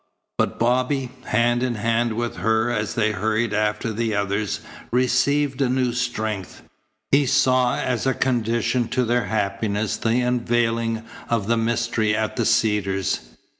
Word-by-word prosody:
But - - 0
Bobby, 125 +2 +1
hand 120 +2 +2
in 125 -2 0
hand 115 +2 0
with 120 +1 -3
her 110 +1 +1
as 110 -2 -2
they 110 -2 +2
hurried 110 +1 0
after 105 +1 0
the 110 0 -1
others, 100 0 -1 0.3
received 130 +3 +1
a 130 - +2
new 125 -1 +1
strength. 110 -6 -3 0.5
He 140 0 +4
saw 130 -2 +3
as 125 0 -1
a 130 - +2
condition 120 -1 0
to 125 +1 0
their 120 +1 +1
happiness 105 0 -1
the 115 +1 +1
unveiling 115 -2 0 0.3
of 115 -4 0
the 115 +3 +2
mystery 115 -2 0
at 110 -1 -1
the - - 0
Cedars. 105 -4 +1
115 Hz, 145 wpm, -23 LUFS, 110-125 Hz, 0.5 s, He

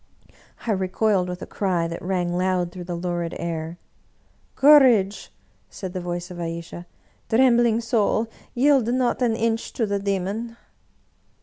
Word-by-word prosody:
I 230 - 0
recoiled, 190 0 +1
with 180 +1 -6
a - - -5
cry 180 -4 -1
that 165 0 -6
rang 175 -1 -1
loud 180 -1 0
through 180 0 -8
the 175 0 -4
lurid 175 -1 -3
air. 165 0 -4 0.4
" - - -39
Courage! 255 -9 +5 0.2
" - - -39
said 185 -2 -7
the 185 - -4
voice 175 +1 -5
of 175 - -8
Ayesha. 170 +1 -6 0.2
" - - -38
Trembling 235 -1 +4
soul, 225 -1 +1 0.3
yield 265 -2 +3
not 250 +1 0
an 235 -3 +2
inch 225 0 -1
to 230 - 0
the 200 -1 -1
demon 200 +4 -3
190 Hz, 160 wpm, -23 LUFS, 175-230 Hz, 0.4 s, Courage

